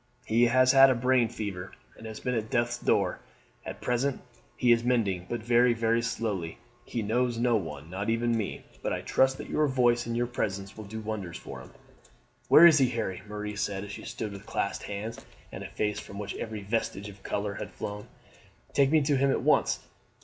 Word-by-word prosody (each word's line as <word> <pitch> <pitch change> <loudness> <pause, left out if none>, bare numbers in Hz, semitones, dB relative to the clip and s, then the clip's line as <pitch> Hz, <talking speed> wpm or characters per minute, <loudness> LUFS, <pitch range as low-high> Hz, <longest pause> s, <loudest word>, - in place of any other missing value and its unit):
He 115 +2 +4
has 130 +2 +5
had 135 -2 +6
brain 125 -2 +3
fever, 100 -5 -5 0.2
and 110 - -10
has 110 -1 -7
been 125 - -2
at 110 -2 -2
death's 120 -1 0
door. - - +1 0.4
At - - -8
present 125 +2 0 0.4
he 125 - +3
is 115 0 +4
mending, 100 -8 0
but 120 -2 -3
very, 120 +1 +4
very 115 0 +2
slowly. 105 -7 -3 0.3
He 115 - -3
knows 120 +3 0
no 120 0 +2
one, 75 -7 -4
not 100 +3 -3
even 115 +1 +1
me, 110 -3 -3 0.2
but - - -1
I - - -2
trust 130 0 +2
that - - -7
your 155 -1 +1
voice 120 -3 +2
and 115 0 -2
your 120 - +1
presence 100 -4 -3
will 110 - -8
do 110 +2 -6
wonders 105 -5 -5
for - - -9
him." - - -12 0.8
"Where 165 - +9
is 160 -3 +8
he, 130 -2 +4
Harry?" 110 -7 -3
Marie 105 0 -5
said 100 -1 -2
as 105 - -7
she - - -8
stood 110 -2 -5
with 100 -1 -10
clasped - - -2
hands, 105 +3 -5 0.3
and - - -7
a - - -6
face 105 -1 -2
from 100 - -10
which 100 0 -4
every 110 -2 -5
vestige 105 -1 -2
of 100 -1 -12
colour 100 +1 -2
had - - -6
flown. 105 0 -6 0.7
"Take 140 -1 +4
me 155 0 +4
to 140 -1 +2
him 140 +1 +3
at - - 0
once." - - +3
115 Hz, 210 wpm, -28 LUFS, 105-125 Hz, 0.8 s, Where